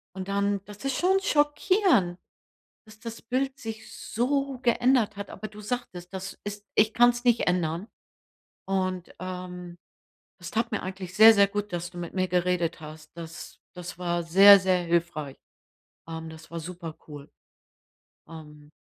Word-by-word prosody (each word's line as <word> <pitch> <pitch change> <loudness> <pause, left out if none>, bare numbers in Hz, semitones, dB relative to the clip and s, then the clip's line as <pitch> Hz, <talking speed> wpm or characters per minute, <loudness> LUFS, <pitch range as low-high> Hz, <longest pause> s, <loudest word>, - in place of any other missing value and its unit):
Und 190 -1 -6
dann 200 0 0
das 205 +4 -12
ist 270 -1 -1
schon 380 +2 +3
schockierend, 295 - +2 0.7
dass 215 0 -16
das 230 0 -8
Bild 265 +2 -2
sich 220 -3 -8
so 270 +2 -1
geändert 240 -3 +2
hat. 200 -1 -7
Aber 215 +3 -7
du 210 +1 -12
sagtest, 200 -6 -5
das 190 +1 -6
ist 205 0 -6
ich 215 +1 +4
kann's 240 +1 +4
nicht 240 -1 +3
ändern. 175 +2 -1 0.8
Und, 185 -2 -2
ähm, 180 -1 -7 0.6
es 175 - -8
tat 225 +1 -1
mir 220 - -1
eigentlich 185 -1 -7
sehr, 220 +2 +9
sehr 200 -1 +5
gut, 205 -1 -4
dass 175 0 -3
du 175 - -11
mit 170 -1 -6
mir 185 -1 0
geredet 180 -2 0
hast. 155 0 -11
Das 165 0 -9
das 180 -1 -8
war 175 -1 -1
sehr, 195 +4 +8
sehr 185 -1 +2
hilfreich. 170 -4 -1 0.7
Ähm, 160 0 -6
das 160 +1 -13
war 170 - -5
super 170 -1 -8
cool. 145 -1 -10 1.0
Ähm. 150 -2 -12
190 Hz, 155 wpm, -27 LUFS, 175-225 Hz, 1.0 s, sehr